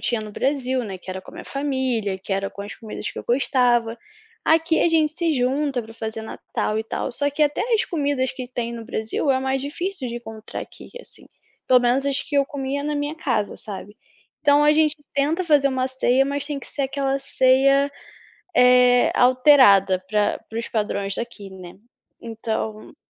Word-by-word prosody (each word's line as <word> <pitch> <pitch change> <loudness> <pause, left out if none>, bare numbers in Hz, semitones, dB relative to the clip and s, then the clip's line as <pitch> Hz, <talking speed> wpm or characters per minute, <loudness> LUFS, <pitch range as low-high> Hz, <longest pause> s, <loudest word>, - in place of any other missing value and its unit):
tinha 235 -3 -1
no 215 -1 -8
Brasil, 260 -1 -1
né, 195 -3 -6
que 185 - -10
era 190 0 -5
com - - -14
a - - -14
minha - - -9
família, 260 -8 -2
que 195 - -6
era 195 0 -1
com 200 - -9
as 205 - -8
comidas 220 -2 -6
que - - -9
eu - - -7
gostava. 240 -2 +2 0.5
Aqui 325 +1 +3
a - - +4
gente 315 -2 +2
se 335 -2 +1
junta 265 +1 0
para 225 0 -12
fazer 220 -1 -5
Natal 220 0 -3
e 220 - -3
tal, 225 - -4
só 285 +3 0
que 300 +2 0
até 290 0 +1
as 435 - +2
comidas 285 -5 -1
que 255 -1 -7
tem 235 -2 -4
no 230 -1 -7
Brasil 225 +4 -1
é 260 - +3
mais 265 0 -1
difícil 300 0 -4
de 235 - -5
encontrar 225 -2 -8
aqui - - -13
assim. - - -16 0.4
Pelo 250 -1 +6
menos 250 +3 +1
as 275 -1 -1
que 290 - -4
eu 280 - +4
comia 280 0 -3
na 300 +1 -2
minha 290 +2 -2
casa, 245 -10 -1
sabe? 205 0 -9 0.4
Então 290 0 +4
a 300 - +6
gente 305 -1 +2 0.2
tenta 305 +6 +1
fazer 290 -4 +4
uma 260 -1 0
ceia 260 0 +2
mas 285 0 -3
tem 290 -2 -3
que - - -11
ser 285 - -4
aquela 275 0 -1
ceia, 275 +1 +3 0.6
eh, 250 0 +5
alterada 245 -8 +5
para 210 -1 +1
para 225 - -5
os 230 - -4
padrões 200 -2 -2
daqui, 235 -4 -6
né. 185 -1 -11 0.4
Então 220 0 -5
255 Hz, 195 wpm, -22 LUFS, 225-285 Hz, 0.6 s, Pelo